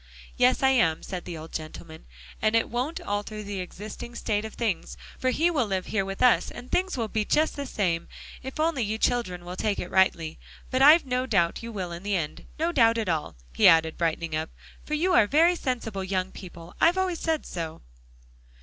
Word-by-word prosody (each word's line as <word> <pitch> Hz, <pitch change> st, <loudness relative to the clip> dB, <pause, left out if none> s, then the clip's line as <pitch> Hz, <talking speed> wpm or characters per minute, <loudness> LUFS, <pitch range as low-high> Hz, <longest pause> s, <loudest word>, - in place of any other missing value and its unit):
"Yes, 250 Hz, +2 st, +3 dB
I 265 Hz, -, +6 dB
am," 205 Hz, -12 st, +2 dB
said 185 Hz, -2 st, -6 dB
the 170 Hz, -, -6 dB
old 160 Hz, +1 st, -10 dB
gentleman, 160 Hz, 0 st, -8 dB, 0.4 s
"and 215 Hz, +1 st, +2 dB
it 230 Hz, -, +2 dB
won't 255 Hz, +7 st, -2 dB
alter 205 Hz, +1 st, -4 dB
the 200 Hz, -1 st, -5 dB
existing 210 Hz, +6 st, -8 dB
state 210 Hz, -3 st, -1 dB
of 220 Hz, -, -8 dB
things, 215 Hz, -8 st, -2 dB, 0.2 s
for 255 Hz, -, +1 dB
he 325 Hz, +7 st, +2 dB
will 255 Hz, -9 st, +1 dB
live 190 Hz, -2 st, -2 dB
here 215 Hz, -3 st, 0 dB
with 195 Hz, +3 st, -3 dB
us, 250 Hz, -, +4 dB
and 245 Hz, +1 st, -10 dB
things 370 Hz, -4 st, 0 dB
will 230 Hz, -2 st, -1 dB
be 215 Hz, 0 st, -1 dB
just 310 Hz, +8 st, +1 dB
the 280 Hz, -1 st, -4 dB
same, 175 Hz, -8 st, -1 dB, 0.3 s
if 265 Hz, +3 st, -7 dB
only 315 Hz, -4 st, +1 dB
you 215 Hz, 0 st, -1 dB
children 185 Hz, -8 st, 0 dB
will 180 Hz, +1 st, -6 dB
take 205 Hz, +1 st, -1 dB
it 180 Hz, -, -5 dB
rightly. 170 Hz, -4 st, +2 dB, 0.3 s
But 255 Hz, 0 st, +1 dB
I've 300 Hz, +3 st, +8 dB
no 255 Hz, 0 st, -1 dB
doubt 175 Hz, -8 st, +1 dB
you 230 Hz, 0 st, -6 dB
will 185 Hz, -5 st, -4 dB
in 170 Hz, 0 st, -6 dB
the 200 Hz, +1 st, -1 dB
end; 160 Hz, -5 st, -4 dB
no 330 Hz, +2 st, 0 dB
doubt 230 Hz, -6 st, +4 dB
at 220 Hz, -5 st, -1 dB
all," 160 Hz, -3 st, -2 dB, 0.2 s
he -, -, +5 dB
added, 160 Hz, -1 st, +5 dB
brightening 165 Hz, -1 st, -1 dB
up, 155 Hz, +1 st, -2 dB, 0.3 s
"for 300 Hz, -, -2 dB
you 360 Hz, +4 st, +1 dB
are 220 Hz, -12 st, +5 dB
very 330 Hz, +8 st, +4 dB
sensible 235 Hz, -, -3 dB
young 190 Hz, 0 st, -2 dB
people. 175 Hz, -2 st, -11 dB
I've 345 Hz, +3 st, +5 dB
always 370 Hz, -3 st, 0 dB
said 320 Hz, -2 st, -1 dB
so." 165 Hz, -2 st, -6 dB
215 Hz, 215 wpm, -26 LUFS, 180-255 Hz, 0.4 s, I've